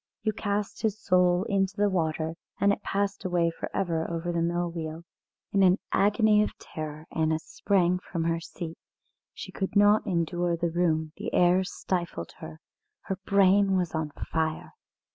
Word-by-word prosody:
You 215 Hz, -1 st, +1 dB
cast 205 Hz, 0 st, -2 dB
his 215 Hz, -2 st, 0 dB
soul 180 Hz, -2 st, +3 dB
into 195 Hz, +1 st, 0 dB
the 205 Hz, 0 st, +3 dB
water, 160 Hz, -4 st, -1 dB, 0.3 s
and 200 Hz, 0 st, +4 dB
it -, -, -5 dB
passed 200 Hz, 0 st, -2 dB
away 175 Hz, -2 st, +1 dB
for -, -, -6 dB
ever 165 Hz, -4 st, -1 dB
over 170 Hz, +1 st, -2 dB
the 170 Hz, -1 st, 0 dB
mill 175 Hz, +1 st, 0 dB
wheel." 160 Hz, -1 st, -5 dB, 0.5 s
In 200 Hz, -, +3 dB
an 185 Hz, 0 st, +5 dB
agony 210 Hz, +1 st, +4 dB
of 210 Hz, -, -2 dB
terror 155 Hz, 0 st, -7 dB
Anna 160 Hz, 0 st, +1 dB
sprang 180 Hz, +2 st, +1 dB
from 170 Hz, -2 st, -4 dB
her 165 Hz, 0 st, 0 dB
seat. 165 Hz, 0 st, -8 dB, 0.6 s
She -, -, -8 dB
could 190 Hz, +1 st, -4 dB
not 205 Hz, +1 st, +5 dB
endure 175 Hz, -1 st, 0 dB
the 170 Hz, 0 st, -1 dB
room, 160 Hz, -2 st, +1 dB
the -, -, -4 dB
air 180 Hz, +1 st, +4 dB
stifled 175 Hz, -, -3 dB
her; 80 Hz, 0 st, -9 dB, 0.4 s
her 195 Hz, -, -4 dB
brain 195 Hz, 0 st, +4 dB
was 180 Hz, -3 st, -1 dB
on 160 Hz, -1 st, -1 dB
fire. 160 Hz, +1 st, -3 dB
175 Hz, 165 wpm, -27 LUFS, 165-195 Hz, 0.6 s, an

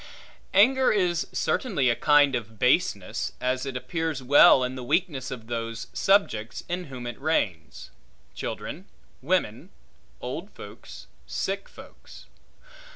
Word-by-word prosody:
Anger 260 Hz, +6 st, +5 dB
is 180 Hz, -5 st, +1 dB
certainly 180 Hz, -, 0 dB
a 120 Hz, -, +3 dB
kind 145 Hz, -1 st, +4 dB
of 110 Hz, -3 st, -4 dB
baseness; 125 Hz, -, 0 dB
as 130 Hz, +1 st, -1 dB
it 130 Hz, -1 st, -3 dB
appears 160 Hz, -1 st, -3 dB
well 135 Hz, 0 st, +7 dB
in 125 Hz, 0 st, -2 dB
the 130 Hz, -1 st, -7 dB
weakness 140 Hz, -1 st, -1 dB
of 125 Hz, -4 st, -7 dB
those 115 Hz, -1 st, -4 dB
subjects 125 Hz, -, +1 dB
in 180 Hz, +1 st, -3 dB
whom 130 Hz, -4 st, -8 dB
it 120 Hz, +1 st, -7 dB
reigns; 90 Hz, -, -2 dB, 0.4 s
children, -, -, -6 dB, 0.3 s
women, -, -, -1 dB, 0.5 s
old -, -, -6 dB
folks, -, -, -11 dB, 0.2 s
sick 195 Hz, +1 st, -3 dB
folks. -, -, -14 dB
135 Hz, 125 wpm, -26 LUFS, 120-175 Hz, 0.5 s, well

